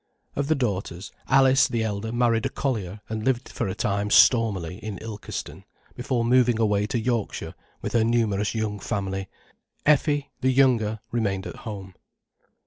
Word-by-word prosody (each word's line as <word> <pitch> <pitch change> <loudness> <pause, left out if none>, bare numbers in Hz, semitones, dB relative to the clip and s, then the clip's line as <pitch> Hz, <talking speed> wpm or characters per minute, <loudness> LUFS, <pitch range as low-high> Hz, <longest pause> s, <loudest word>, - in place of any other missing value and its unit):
Of 140 0 -1
the 155 - +3
daughters, 100 - -3 0.2
Alice, 135 0 +5
the 115 -3 -1
elder, 110 +1 -3
married 120 -1 +2
a - - -5
collier 105 -7 -3
and 110 -1 -4
lived 130 0 0
for 115 - -3
a 95 - -3
time 100 0 -1
stormily 105 -8 +4
in 105 -3 -5
Ilkeston, 105 0 -7 0.3
before 125 -2 -1
moving 120 -1 +4
away 105 -2 +2
to 120 - -1
Yorkshire 115 -1 -2 0.3
with - - -3
her 115 - +4
numerous 110 -3 +1
young 105 -2 -2
family. 95 -1 -3 0.6
Effie, 145 -1 +2
the 130 - +3
younger, 120 -5 +3
remained 100 -5 -1
at - - -7
home. 95 -3 -7
110 Hz, 155 wpm, -25 LUFS, 100-125 Hz, 0.6 s, Alice